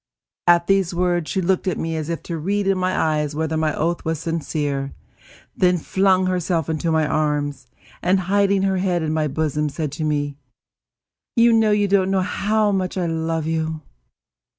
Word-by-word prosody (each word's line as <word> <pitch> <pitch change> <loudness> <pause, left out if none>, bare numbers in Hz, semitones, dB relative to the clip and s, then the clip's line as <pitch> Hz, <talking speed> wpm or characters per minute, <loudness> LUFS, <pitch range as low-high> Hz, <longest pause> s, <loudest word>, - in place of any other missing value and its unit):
At 170 0 +5
these 190 -2 +1
words 175 -2 0
she 190 - 0
looked 185 +1 0
at 185 - 0
me 165 0 -2
as 155 0 -4
if 170 - -3
to 170 -2 -4
read 200 +5 -1
in 195 0 +2
my 185 0 -1
eyes 150 -2 0
whether 160 +1 -1
my 155 -1 +1
oath 170 +2 -1
was 160 0 -1
sincere; 150 -4 -3 0.6
then 180 -1 +3
flung 190 +2 +2
herself 180 -3 0
into 160 +1 -1
my 160 -1 +2
arms, 145 -3 -1 0.3
and, 185 +2 +2
hiding 200 +1 +2
her 190 -1 +1
head 180 -3 0
in 155 0 -1
my 155 -1 +1
bosom, 150 +1 -1
said 150 0 -4
to 155 +2 -5
me: 145 -2 -1 1.0
"You 225 -3 +4
don't 195 -1 +2
know 195 -1 +2
how 210 +2 +1
much 190 -1 -1
I 180 - 0
love 165 -1 -2
you!" 160 -1 -2
170 Hz, 175 wpm, -21 LUFS, 155-190 Hz, 1.0 s, At